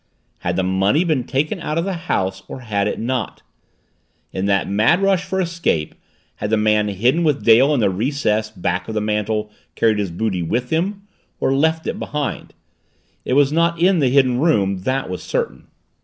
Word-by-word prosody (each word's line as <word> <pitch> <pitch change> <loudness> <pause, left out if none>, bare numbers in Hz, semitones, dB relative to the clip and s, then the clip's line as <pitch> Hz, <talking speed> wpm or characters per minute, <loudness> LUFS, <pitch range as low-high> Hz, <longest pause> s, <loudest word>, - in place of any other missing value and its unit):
Had 85 0 -2
the 95 - 0
money 95 - +2
been 155 -8 0
taken 145 +3 -1
out 150 - -3
of 165 - 0
the 195 - -2
house 95 - -2
or 130 - -8
had 105 -4 -1
it - - -3
not? 125 +1 -3 0.9
In 95 - -2
that 100 -2 +1
mad 110 - +3
rush 195 -2 +2
for 190 +1 -3
escape 170 - -1 0.4
had 105 - -3
the 110 - +2
man 105 0 +2
hidden 120 - +1
with 150 -3 0
Dale 120 +5 +6
in 140 -5 +2
the 100 - +3
recess 110 0 0
back 90 -3 -3
of 110 - -5
the - - +1
mantel 105 0 -1 0.2
carried 110 -2 +2
his 100 -2 -1
booty 95 +1 -2
with 120 +9 -2
him, 195 +5 -1 0.4
or 135 - +1
left 160 +3 +1
it - - -3
behind? 145 -3 -4 0.7
It - - -1
was 140 +1 +4
not 170 +1 +1
in 180 +1 +4
the 135 -4 +3
Hidden 130 -2 +3
Room, 100 - +2
that 135 +1 -1
was 90 -1 -5
certain. - - -3
125 Hz, 190 wpm, -20 LUFS, 105-155 Hz, 0.9 s, Dale